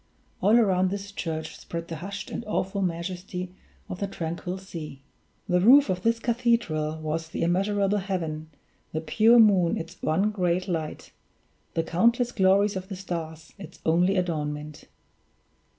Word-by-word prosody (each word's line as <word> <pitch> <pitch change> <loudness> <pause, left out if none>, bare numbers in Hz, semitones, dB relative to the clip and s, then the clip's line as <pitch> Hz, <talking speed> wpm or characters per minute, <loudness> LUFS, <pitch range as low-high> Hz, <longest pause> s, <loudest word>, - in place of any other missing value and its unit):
All 210 +5 +5
around 190 -4 +3
this 200 +1 -5
church 160 -5 -4
spread 170 0 -6
the 165 - -5
hushed 200 +5 -6
and - - -4
awful 200 -1 -1
majesty 180 +1 -4 0.3
of 180 - -6
the 200 - -1
tranquil 175 0 -4
sea. 160 -7 -8 0.4
The 180 0 +2
roof 270 +6 +7
of 180 -1 -2
this 230 +3 +2
cathedral 230 -11 0
was 160 +1 -3
the - - -3
immeasurable 195 +3 +1
heaven, 165 -5 -3 0.4
the 155 - -1
pure 220 +8 +4
moon 195 -7 +5
its 165 - -8
one 190 +7 +1
great 185 -2 0
light, 160 -4 -4 0.6
the 165 - +1
countless 235 +9 +2
glories 200 +1 +3
of 190 0 -5
the 195 - -6
stars 165 -4 -6
its 195 - -10
only 175 +4 +3
adornment. 150 -4 -3
185 Hz, 150 wpm, -26 LUFS, 165-200 Hz, 0.6 s, roof